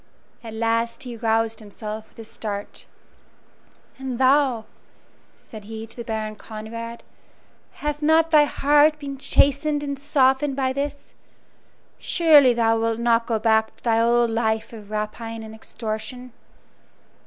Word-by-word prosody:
At 225 -1 -8
last 230 +1 -1
he 245 -2 -7
roused 225 0 0
himself 215 +1 -8
with - - -29
a 225 - -9
start. 205 -2 -6 1.1
"And 260 -2 -4
thou," 260 -3 +3 0.7
said 215 -2 -12
he 220 +1 -7
to 225 - -16
the 235 - -6
Baron 220 -1 -4
Conrad 230 +2 -8 0.7
"hath 295 0 -4
not 320 +2 +3
thy 300 -2 +7
heart 295 +2 +3
been 280 -2 -7
chastened 290 +2 +2
and 280 -1 -4
softened 275 0 +2
by 260 -1 0
this? 285 +1 -5 0.9
Surely 300 -6 +5
thou 225 -1 +2
wilt 225 0 0
not 235 0 +2
go 230 - +1
back 220 0 +2
to - - -25
thy 230 -1 +2
old 235 0 +3
life 225 0 -1
of 210 -2 -11
rapine 220 +2 -4
and 220 0 -9
extortion?" 220 +3 -7
230 Hz, 140 wpm, -23 LUFS, 220-275 Hz, 1.1 s, thy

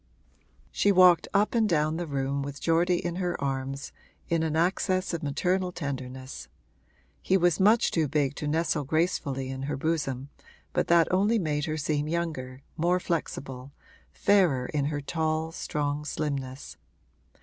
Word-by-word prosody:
She 205 - +3
walked 180 -2 +6
up 205 +2 +2
and 225 -3 +2
down 155 -1 +1
the 175 -1 -3
room 140 -1 -1
with 140 0 -6
Geordie 175 +1 +2
in 175 0 -2
her 180 -2 -2
arms, 135 0 -3 0.4
in 165 -1 +2
an 160 -1 -1
access 185 +2 +1
of 170 - -2
maternal 180 +5 0
tenderness; 130 -5 -6 0.7
he 190 - +3
was 175 -1 +2
much 215 +4 +4
too 160 -3 +1
big 145 -1 0
to 150 - -3
nestle 160 0 0
gracefully 140 -3 -1
in 130 0 -5
her - - -2
bosom, 140 -3 -2 0.4
but - - +1
that 170 -1 +5
only 205 +5 +3
made 150 -6 -1
her 155 -1 -2
seem 150 0 -1
younger, 150 -6 -3
more 175 +3 +2
flexible, 135 -6 -4 0.4
fairer 175 -11 +3
in 145 +1 -1
her 145 0 -2
tall, 160 +1 -1
strong 145 -2 -2
slimness. 140 -3 -4
155 Hz, 150 wpm, -27 LUFS, 140-175 Hz, 0.7 s, walked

